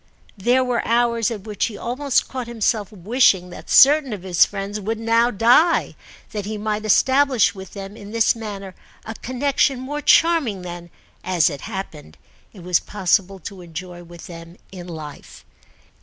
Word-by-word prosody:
There 245 +6 +2
were 250 -2 -1
hours 235 -1 +1
at 220 -4 -6
which 210 -2 -2
he 210 - -6
almost 260 +4 -1
caught 255 -2 -6
himself 220 -3 -1
wishing 195 -2 +2
that - - -11
certain 280 -3 +6
of 195 -4 -7
his 180 -3 +4
friends 200 +1 -5
would 220 +3 -3
now 230 +1 +2
die, 245 - +3 0.4
that 205 -2 -5
he 215 0 -4
might 215 0 -3
establish 260 +2 +3
with 190 -2 -11
them 195 0 -8
in 205 -2 -11
this 225 +1 +2
manner 200 -4 -7 0.3
a 220 - -6
connexion 265 +2 0
more 290 +3 -5
charming 290 - +3
than, 175 -1 -8 0.3
as 175 -3 +2
it 140 - -8
happened, 180 - -8 0.3
it 185 - -14
was 180 -1 +2
possible 195 -1 0
to 190 +2 -9
enjoy 175 +1 -9
with 170 0 -13
them 170 0 -11
in 180 -2 -9
life. 155 -4 -10
210 Hz, 165 wpm, -21 LUFS, 185-240 Hz, 0.4 s, certain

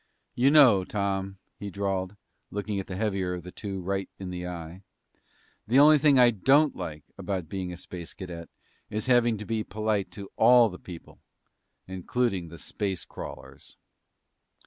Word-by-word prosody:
"You 130 +3 +3
know, 130 -10 +7
Tom," 95 -1 -2 0.2
he 100 - -5
drawled, 95 0 -2 0.3
looking 105 0 -3
the 95 -1 -7
heavier 95 -3 -1
of 90 - -8
the 90 - -9
two 95 -2 -5
right 95 +1 -2
in 95 -2 -6
the 90 0 -5
eye, 85 +1 -7 0.9
"the 120 +5 +3
only 150 +1 +7
thing 140 -1 +5
I 125 -1 +7
don't 135 +8 +3
like 75 -1 -6 0.2
about 95 -5 -3
being 95 0 -4
a 90 - -7
Space 85 -1 -9
Cadet 85 -3 -8 0.4
is 105 +1 -3
having 120 -3 +3
to 105 - -7
be 110 0 -1
polite 105 -1 -1
to 100 -2 -9
all 120 0 +6
the 90 - -10
people, 85 -3 -11 0.7
including 95 0 -1
the 85 +1 -11
space 95 +4 -4
crawlers!" - - -10
100 Hz, 160 wpm, -27 LUFS, 90-110 Hz, 0.9 s, know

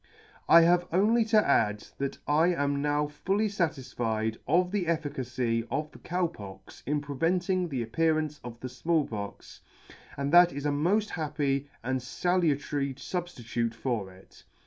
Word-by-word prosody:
" - - -27
I - - +9
have 175 +1 +3
only 215 +7 +3
to 215 -1 +3
add, 105 -6 +2
that 140 0 -2
I 155 +3 +4
am 145 -5 0
now 145 0 +1
fully 190 +9 -1
fatisfied 120 - -2
of 180 +3 +2
the 195 -4 -1
efficacy 130 -7 -1
of 150 +4 -2
the - - -14
Cow 180 +1 -1
Pox 95 - -9
in 150 +1 0
preventing 175 +5 0
the 130 -5 -2
appearance 155 +3 0
of 120 -1 -8
the 130 - -4
Small 160 +3 0
Pox, 100 -2 -7 0.6
and 140 0 -2
that 175 0 +8
it - - -7
is 145 - -4
a 145 - +2
moll 170 +9 +2
happy 145 -7 -2
and 130 +2 -1
falutary 145 -3 0
fubftitute 120 -9 -3
for 115 -6 -2
it. 95 +1 -18
145 Hz, 160 wpm, -28 LUFS, 130-175 Hz, 0.6 s, I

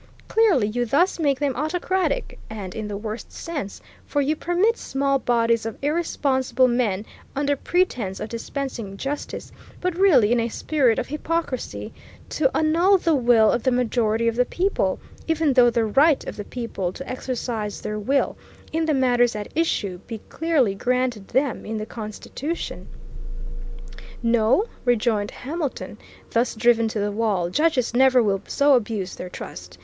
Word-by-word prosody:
Clearly 395 - +3
you 245 +3 -1
thus 340 - +2
make 280 -4 +1
them 280 -3 0
autocratic, 355 - -1
and 200 -4 -6
in 215 -1 -4
the 205 -1 -4
worst 215 +2 -6
sense, 295 - -5 0.3
for 290 - 0
you 285 +2 +1
permit 355 +8 +1
small 275 -5 0
bodies 230 -2 +2
of 225 -1 -5
irresponsible 265 -5 +1
men 225 -5 0 0.3
under 285 +1 +1
pretence 255 - -1
of - - -4
dispensing 230 -4 -5
justice, 280 +6 -5 0.3
but 365 -1 -1
really 305 - +5
in 240 - +3
a 230 0 0
spirit 255 -2 +1
of - - -1
hypocrisy, 305 -2 -3 0.4
to 275 -3 +2
annul 340 +5 +4
the 335 -2 +1
will 235 -5 +5
of 240 - 0
the 260 - +2
majority 230 -2 +1
of 230 - +1
the 250 - +4
people, 380 +9 0 0.3
even 320 -3 +2
though 250 -2 +6
the 230 -1 +1
right 280 +7 +3
of - - -6
the 205 - -6
people 230 -7 -4
to 270 +8 -9
exercise 240 -4 -3
their 210 0 -4
will, 270 +7 +1 0.4
in 320 0 0
the 305 - +2
matters 245 -3 +3
at 210 -1 -5
issue, 205 - 0
be 230 - -5
clearly 305 -10 +1
granted 245 -1 -1
them 265 0 0
in 220 0 -4
the 215 - -3
Constitution. 220 - -6 1.4
No, 235 - +3 0.2
rejoined 225 -4 +1
Hamilton, 295 +1 -5 0.3
thus 235 +1 +1
driven 230 0 +3
to 220 -1 -3
the 205 0 0
wall, 200 -5 0
judges 275 - +1
never 255 0 +5
will 195 -2 +1
so 285 0 +3
abuse 210 -6 0
their 180 - -7
trust. 90 - -9
245 Hz, 160 wpm, -23 LUFS, 220-290 Hz, 1.4 s, though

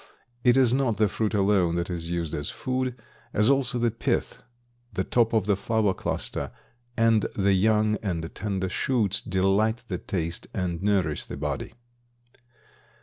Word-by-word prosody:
It 125 0 +5
is 125 -3 +5
not 130 -5 +1
the 110 - +4
fruit 110 +2 -1
alone 95 -4 +3
that 85 +1 -2
is 85 -1 -4
used 85 -2 -2
as 75 -1 -3
food, 130 -1 -2 0.4
as 105 +5 +4
also 135 -3 +1
the 120 -1 +1
pith, 115 - -2 0.5
the 95 - -1
top 115 +3 +2
of 110 -4 +2
the 100 -1 +3
flower 105 0 +1
cluster - - -3 0.5
and 115 -2 +3
the 100 0 +3
young 105 +2 +3
and 85 -5 -3
tender 95 -3 -2
shoots 105 0 +1
delight 105 +4 +1
the 90 -3 -2
taste 85 -2 -3
and 90 -2 -2
nourish 95 -7 +1
the - - -7
body. 75 -1 -4
100 Hz, 155 wpm, -26 LUFS, 90-115 Hz, 0.5 s, It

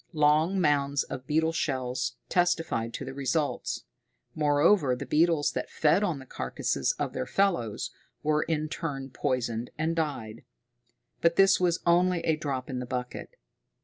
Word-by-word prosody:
Long 155 +5 +3
mounds 145 -4 +2
of 130 0 -8
beetle 160 +2 +2
shells 130 -6 -2
testified 165 -10 +1
to - - -5
the 135 - -6
results; 140 - -1 0.5
moreover, 150 -1 +3
the 125 - -6
beetles 160 -1 +2
that - - -4
fed 160 +5 +3
on 175 -7 0
the 135 - -10
carcasses - - -1
of - - -3
their - - -3
fellows, 170 - 0 0.3
were 150 0 +2
in 155 -1 -1
turn 140 -5 -5
poisoned 120 -2 -2
and 160 +2 0
died. 135 -9 -3 0.8
But 170 0 +3
this 195 0 +5
was 180 -1 +1
only 175 0 +3
a 160 - +1
drop 140 -4 -3
in 130 -2 -4
the 125 - -5
bucket. 125 - -5
150 Hz, 150 wpm, -28 LUFS, 130-165 Hz, 0.8 s, this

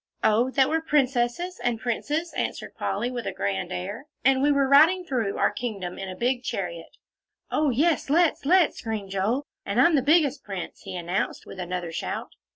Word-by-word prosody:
"Oh, 230 +4 +3
that 265 0 +3
we 320 - +1
were - - -3
princesses 280 +3 0
and 240 -2 0
princes," 295 +8 -2
answered - - -3
Polly, 245 - -2
with 245 -2 -4
a - - -1
grand 190 -2 -2
air, 200 +10 -5 0.2
"and 265 0 +4
we 290 +1 +4
were 280 -1 +3
riding 320 +7 +6
through 240 - -1
our - - +3
kingdom 200 -7 -5
in 195 -1 -5
a 185 - -6
big 245 +4 0
chariot." 175 -8 -5 0.5
"Oh, 300 -1 +2
yes, 295 +4 +1
let's 330 +1 +3
let's!" 350 +3 +3
screamed 215 -4 -4
Joel, 215 +9 0 0.2
"and - - -1
I'm 340 - +6
the 285 - +4
biggest 295 -1 +3
prince," 195 -3 -6
he - - -6
announced, 175 +2 -2
with - - -10
another 180 -1 -4
shout. - - -4
245 Hz, 190 wpm, -25 LUFS, 195-295 Hz, 0.5 s, riding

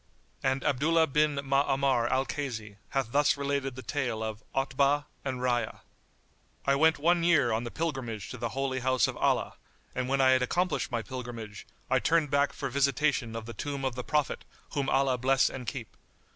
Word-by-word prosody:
And 130 0 0
Abdullah 155 +4 +3
bin 150 0 +2
Ma'amar 135 -3 +2
al 130 +1 +1
Kaysi 110 -9 -5
hath 135 -4 -1
thus 145 +1 +3
related 140 -2 -1
the 130 - -8
tale 120 -3 -2
of 110 -1 -4
OTBAH[FN#79] 140 +2 +2 0.2
AND 130 -2 -3
RAYYA. 120 -3 0 0.8
I 140 - +4
went 160 +3 +4
one 170 +3 +2
year 155 -8 +4
on 110 +2 -1
the - - -3
pilgrimage 130 - -4
to 125 - -6
the 120 0 -2
Holy 135 0 -2
House 130 0 +2
of - - -4
Allah, - - +1 0.4
and 130 0 -2
when 135 0 +1
I 130 -1 +6
had 130 0 +4
accomplished 180 +8 0
my 120 -2 -1
pilgrimage, 120 -5 -7 0.2
I - - +3
turned 160 -3 +2
back 140 0 +3
for 135 - -4
visitation 140 -2 +1
of 115 -1 -5
the 115 - -7
tomb 140 0 -4
of 130 - 0
the 125 +1 -5
Prophet, 150 0 0 0.3
whom 140 -3 -1
Allah 135 -2 +2
bless 135 +2 +3
and 125 -3 -7
keep! 125 -6 -6
135 Hz, 185 wpm, -29 LUFS, 120-140 Hz, 0.8 s, I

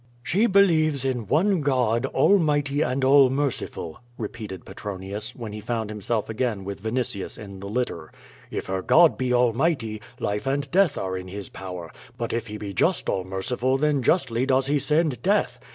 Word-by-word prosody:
"She 200 - +2
believes 155 - +3
in 125 -5 -1
one 175 - +2
God, 125 -3 +1
almighty 145 -6 +2
and 130 +1 0
all 135 -1 +7
merciful," 135 - -2 0.2
re 110 - -3
peated 105 -6 -8
Petronius, 100 +3 -6
when 115 -4 -7
he 105 - -6
found 110 -1 -3
himself 105 +1 -2
again 110 -3 -2
with 100 0 -6
Vinitius 110 -3 -2
in 100 -2 -9
the 100 +1 -7
litter. 105 -9 -3 0.4
"If - - -4
her 95 0 -2
God 165 - +5
be 130 -1 -1
almighty, 120 -2 +1 0.2
life 105 +5 -2
and 140 +1 -1
death 185 -5 +3
are 95 -1 -2
in 95 0 -6
his 100 +1 -7
power; 90 -3 -7 0.3
but 115 -1 -3
if 115 0 -2
he 105 0 -6
be 100 -2 -6
just - - +1
all 95 - 0
merciful 120 +8 -1
then 145 -1 +1
justly 130 -4 +1
does 130 0 +3
he 145 +1 +1
send 150 -4 +1
death. 205 +7 +1
120 Hz, 180 wpm, -25 LUFS, 105-140 Hz, 0.4 s, all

